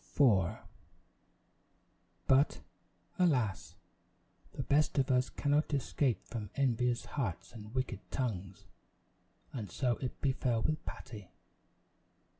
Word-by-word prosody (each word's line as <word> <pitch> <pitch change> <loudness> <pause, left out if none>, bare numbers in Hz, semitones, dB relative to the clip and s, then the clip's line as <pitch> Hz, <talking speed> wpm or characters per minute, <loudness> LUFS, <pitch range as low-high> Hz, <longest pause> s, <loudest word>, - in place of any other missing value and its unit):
Patty 145 - 0
in - - +9
Trouble 95 -7 +2 1.7
But, 135 +2 +4 0.6
alas! 125 - +1 0.8
the 135 - -3
best 150 +2 +2
of 135 0 +3
us 125 0 +3
cannot 145 +1 +1
escape 135 -2 0
from 110 -4 -5
envious 125 -3 +1
hearts 120 - -3
and 110 +1 -10
wicked 125 -6 -1
tongues, 100 -6 -3 0.9
and 110 -6 -4
so 125 -3 0
it 130 - -5
befell 125 -4 +1
with 155 -1 0
Patty. 105 -5 -8
125 Hz, 110 wpm, -33 LUFS, 110-140 Hz, 1.7 s, in